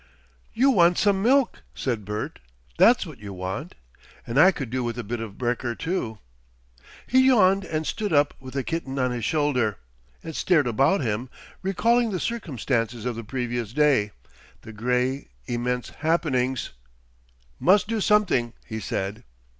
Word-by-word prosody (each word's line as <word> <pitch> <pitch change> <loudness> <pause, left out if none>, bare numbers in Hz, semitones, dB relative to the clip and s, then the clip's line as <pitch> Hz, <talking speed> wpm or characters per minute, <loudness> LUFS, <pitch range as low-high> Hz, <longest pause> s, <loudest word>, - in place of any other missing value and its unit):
"You 265 +4 +4
want 175 -6 +4
some 200 -2 +2
milk," 260 +3 +2
said 115 -6 -2
Bert. 105 +1 -4 0.4
"That's 245 -3 +6
what 155 -8 -11
you 100 -2 -8
want. 95 - -5 0.5
And 120 +4 0
I 185 +5 +8
could 135 -10 -6
do 130 0 -1
with 120 0 -3
a 120 - -3
bit 115 +3 -4
of 110 -3 -7
brekker 120 -1 -2
too." 140 - -3 0.9
He 260 +1 +4
yawned 195 -6 +4
and 155 0 -3
stood 210 +3 -2
up, 145 -1 +3
with 130 0 -10
the 135 - 0
kitten 140 -4 -4
on 130 -1 +1
his 120 -2 -4
shoulder, 140 - +1 0.5
and 160 -2 -7
stared 165 -6 +3
about 135 - +2
him, 120 +1 -2 0.3
recalling 230 +5 +2
the 185 -4 -2
circumstances 125 - -2
of 125 -2 -2
the 115 - -6
previous 120 -1 -3
day, 140 -8 +3 0.5
the 110 - -11
grey, 125 +4 -1 0.2
immense 125 +1 -2
happenings. 130 -6 0 0.9
"Mus' 190 +2 +5
do 220 0 -2
something," 185 - +2
he 110 -1 -5
said. 100 0 -4
130 Hz, 155 wpm, -25 LUFS, 120-180 Hz, 0.9 s, I